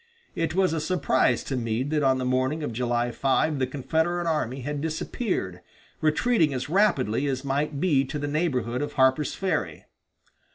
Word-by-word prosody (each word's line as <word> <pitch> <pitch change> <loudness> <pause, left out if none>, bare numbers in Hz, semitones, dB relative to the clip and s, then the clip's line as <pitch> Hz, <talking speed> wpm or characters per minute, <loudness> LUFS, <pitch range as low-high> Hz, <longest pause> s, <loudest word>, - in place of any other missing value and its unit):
It 165 0 -2
was 185 -3 +2
a 160 - -1
surprise 140 -7 +1
to 135 - -3
Meade 120 +3 -2
that 155 -1 +1
on 135 -2 +3
the 130 - -2
morning 130 +5 0
of 120 - -3
July 120 0 0
5 140 +4 +1
the 130 - +1
Confederate 160 +6 -1
army 145 -5 -1
had 145 +2 -3
disappeared, 160 - -3 0.4
retreating 155 - +2
as 130 +3 -4
rapidly 145 - +2
as 135 0 -2
might 140 +1 -1
be 150 -6 +3
to 140 - -5
the 145 0 -3
neighborhood 130 -6 -1
of 145 - -3
Harper's 130 +2 +2
Ferry. 190 -1 -2
145 Hz, 170 wpm, -26 LUFS, 130-160 Hz, 0.4 s, on